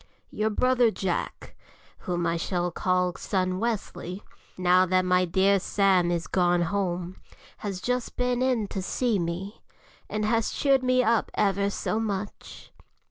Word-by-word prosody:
Your 215 +1 0
brother 250 +2 +3
Jack, 190 -4 -4 0.5
whom 175 -1 0
I 165 0 +1
shall 175 +1 -1
call 180 +1 0
son 185 -2 -1
Wesley, 205 -4 -3 0.3
now 180 0 +4
that 185 0 +2
my 180 0 +3
dear 190 +3 +3
Sam 190 -2 +2
is 170 -1 -1
gone 175 -1 +2
home, 180 -1 -2 0.4
has 195 -3 -5
just 250 +4 -2
been 250 0 0
in 250 -5 +1
to 195 - -4
see 220 +3 0
me, 175 +4 -4 0.5
and 210 0 -2
has 225 0 +1
cheered 275 -2 +2
me 255 0 +3
up 230 -1 +2
ever 200 0 +1
so 215 +2 -2
much. 205 -2 -5
195 Hz, 145 wpm, -26 LUFS, 180-220 Hz, 0.5 s, now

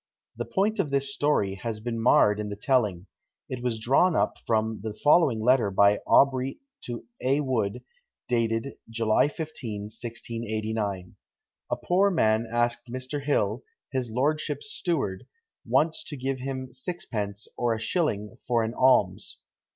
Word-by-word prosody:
The - - -4
point 210 +3 0
of 160 - +1
this 140 0 0
story 140 -11 +1
has 115 -2 -3
been 115 +1 -3
marred 105 -3 +5
in 105 -1 -3
the 100 - -4
telling: 105 -6 +1 0.4
it 130 -1 -5
was 120 -2 -1
drawn 140 +10 +3
up - - +1
from 110 -1 +1
the 110 -1 -5
following 145 -3 +4
letter 120 -1 +3
by 100 +1 +4
Aubrey 135 -1 +4 0.3
to 120 -1 -6 0.2
A. 135 +3 +2
Wood, 125 -4 -1 0.4
dated 115 +2 0 0.2
July 115 +2 +2
15, 140 -9 -5
1689. 110 -3 -4 0.5
"A - - +1
poor 190 +3 +2
man 110 - +2
asked 120 +1 0
Mr. 130 +3 -4
Hill, 120 -5 +1 0.3
his 130 -3 -1
lordship's 145 - -1
steward, 135 - -2 0.4
once 160 +1 +2
to 145 - -6
give 130 +1 -2
him 130 -1 -5
sixpence, 110 - -4
or 120 -2 +1
a - - -5
shilling, 115 - -1
for 120 -2 +2
an 110 +1 -2
alms. 120 -8 +2
120 Hz, 145 wpm, -27 LUFS, 110-135 Hz, 0.5 s, marred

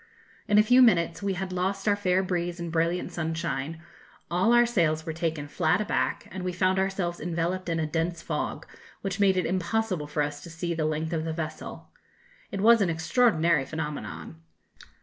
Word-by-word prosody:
In 210 -1 +4
a 210 - +7
few 250 +4 +6
minutes 170 -8 +4
we 200 -1 0
had 185 0 -4
lost 190 +3 -2
our 205 - +4
fair 190 -2 +1
breeze 175 -1 -2
and 170 -1 -4
brilliant 170 +2 0
sunshine, 160 -1 -3 0.5
all 185 +6 +3
our 240 0 +6
sails 165 -9 +1
were 160 - -3
taken 160 -3 -2
flat 160 +4 +1
aback, 215 - -1
and 190 - -5
we 180 - -1
found 185 +1 +2
ourselves 190 -3 -1
enveloped 175 +2 -2
in 165 -1 0
a 160 - 0
dense 165 +2 -1
fog, - - -3 0.4
which 195 0 -3
made 195 -2 +4
it 180 - +1
impossible 185 -2 -1
for 150 0 0
us 145 0 -4
to 170 - -10
see 170 +1 -3
the 160 -2 -1
length 155 +2 -2
of 160 -1 -1
the 160 0 -3
vessel. 155 -1 -6 0.6
It 195 - -4
was 230 +1 +6
an 190 - +2
extraordinary 165 - +2
phenomenon. 120 - -6
170 Hz, 190 wpm, -27 LUFS, 160-190 Hz, 0.6 s, a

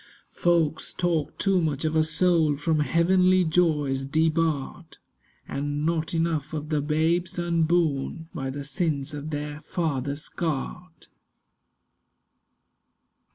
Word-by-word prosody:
Folks 165 -3 +1
talk 170 -4 -1
too 195 -3 +2
much 150 -2 -1
of 155 0 0
a 160 - +4
soul 160 -2 +2
From 155 +1 0
heavenly 185 +4 +3
joys 155 -5 +1
debarred— 160 +1 -1 0.5
And 145 +1 -2
not 165 0 0
enough 165 -3 -1
of 150 -1 -4
the 150 -2 +1
babes 160 +4 0
unborn, 165 -3 0
By 135 -6 -3
the 140 +2 -5
sins 150 -1 -1
of 145 +1 -5
their 150 0 -5
fathers 145 -4 -2
scarred. 165 +1 -4
160 Hz, 110 wpm, -26 LUFS, 145-170 Hz, 0.5 s, a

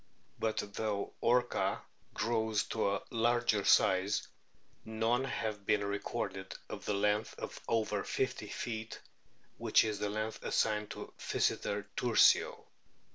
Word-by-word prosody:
But 110 -1 0
though 105 -2 -2
Orca* 120 +1 +2 0.4
grows 110 -2 +1
to 110 -3 +1
a 100 0 -2
large 120 0 +2 0.2
size, 95 +1 +4 0.6
none 115 +4 0
have 105 -6 -3
been 105 -1 +3
recorded 100 -1 -3
of - - -7
the 105 - 0
length 105 +2 +1
of - - -6
over 115 -2 0
50 - - -2
feet, 110 -1 -5 0.6
which - - +4
is 110 -2 -2
the 105 - -1
length 110 +1 -3
assigned 105 -1 +1
to - - -8
Pkyseter 100 -1 0
tursio. 120 -2 +4
110 Hz, 125 wpm, -33 LUFS, 105-115 Hz, 0.6 s, size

